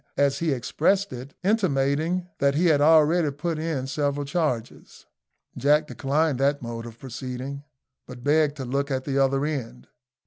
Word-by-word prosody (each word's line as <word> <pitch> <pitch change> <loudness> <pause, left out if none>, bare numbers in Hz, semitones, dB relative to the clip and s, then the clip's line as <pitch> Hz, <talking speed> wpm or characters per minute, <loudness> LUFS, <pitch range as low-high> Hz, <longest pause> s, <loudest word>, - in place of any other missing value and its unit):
as 140 -1 +2
he 165 -2 0
expressed 175 +9 0
it, 130 +3 -9
intimating 175 -3 +1
that 140 0 +2
he 170 +4 +2
had 155 -4 +4
already 160 +1 +5
put 155 +3 -3
in 155 -5 -2
several 145 +1 -1
charges. 140 -7 -3 0.5
Jack 145 +4 +3
declined 145 -1 0
that 140 +1 +2
mode 115 -1 -6
of 115 -1 -11
proceeding, 130 +2 -6 0.4
but 125 -1 -10
begged 150 0 +3
to 135 - -5
look 140 +3 -1
at 130 -1 -1
the 140 -1 0
other 135 +1 +2
end. 125 -5 -5
140 Hz, 160 wpm, -25 LUFS, 135-155 Hz, 0.5 s, already